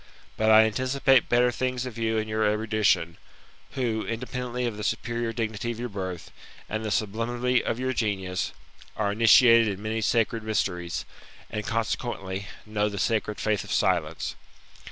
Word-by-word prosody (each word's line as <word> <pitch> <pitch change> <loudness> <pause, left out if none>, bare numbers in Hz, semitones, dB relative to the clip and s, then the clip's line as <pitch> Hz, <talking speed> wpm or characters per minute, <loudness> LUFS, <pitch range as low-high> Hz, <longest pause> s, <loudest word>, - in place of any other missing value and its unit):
But 110 0 +2
I 110 0 +8
anticipate 130 +3 +2
better 120 0 +4
things 125 +1 -2
of 125 -4 -6
you 110 -1 0
and 110 0 -1
your 110 0 0
erudition, 105 -6 +1 0.6
who, 115 -5 -1
independently 125 +1 -3
of 115 -3 -2
the 105 - -6
superior 120 +1 -2
dignity 110 0 -3
of 120 -1 -4
your 120 0 -3
birth, 95 -4 -6 0.4
and 110 +1 -3
the 110 - -2
sublimity 115 +5 0
of - - -1
your 130 0 -1
genius, 95 -5 -1 0.5
are 105 -2 +1
initiated 115 +1 +6
in 100 -2 -3
many 110 +1 -2
sacred 115 +1 +1
mysteries, 90 -5 -2 0.5
and, 105 -1 -4
consequently, 105 -4 -2 0.2
know 105 -1 0
the 100 - -6
sacred 105 +1 0
faith 105 -2 0
of - - -9
silence. - - 0
110 Hz, 155 wpm, -26 LUFS, 105-120 Hz, 0.6 s, I